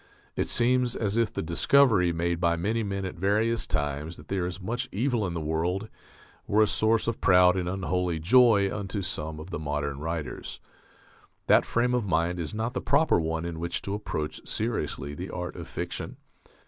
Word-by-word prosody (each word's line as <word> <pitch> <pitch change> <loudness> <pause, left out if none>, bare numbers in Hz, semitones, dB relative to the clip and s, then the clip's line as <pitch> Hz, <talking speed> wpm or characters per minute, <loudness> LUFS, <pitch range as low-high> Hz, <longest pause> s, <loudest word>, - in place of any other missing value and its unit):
It - - -1
seems 125 0 +2
as 105 -2 -1
if 115 -2 +2
the - - -3
discovery 95 - +4
made 85 0 -1
by 85 -1 +2
many 105 +7 -1
men 100 -2 -3
at 95 - -4
various 105 +5 +1
times 75 +3 -2
that 75 - -15
there 95 -3 -1
is 90 +1 -6
much 120 +6 -3
evil 115 -1 0
in 85 - -4
the - - -2
world 85 +7 -2 0.6
were 110 +1 +4
a - - +5
source 110 +2 +2
of 115 - -2
proud 90 -1 +5
and 90 -2 -1
unholy 90 -2 -1
joy 100 +2 +5
unto 100 0 -4
some 80 -3 -3
of 80 +4 -9
the 80 - -3
modern 70 -2 -3
writers. 80 -2 -5 0.9
That - - +5
frame 125 +1 +1
of 120 -4 0
mind 85 +1 0
is 80 - -3
not 110 +3 -3
the - - -2
proper 160 - +3
one 80 0 -2
in 85 -1 -5
which 85 +1 -2
to 100 - -3
approach 80 -7 -4
seriously 105 - -2
the - - -6
art - - -5
of - - -8
fiction.... - - -5
95 Hz, 190 wpm, -27 LUFS, 80-110 Hz, 0.9 s, a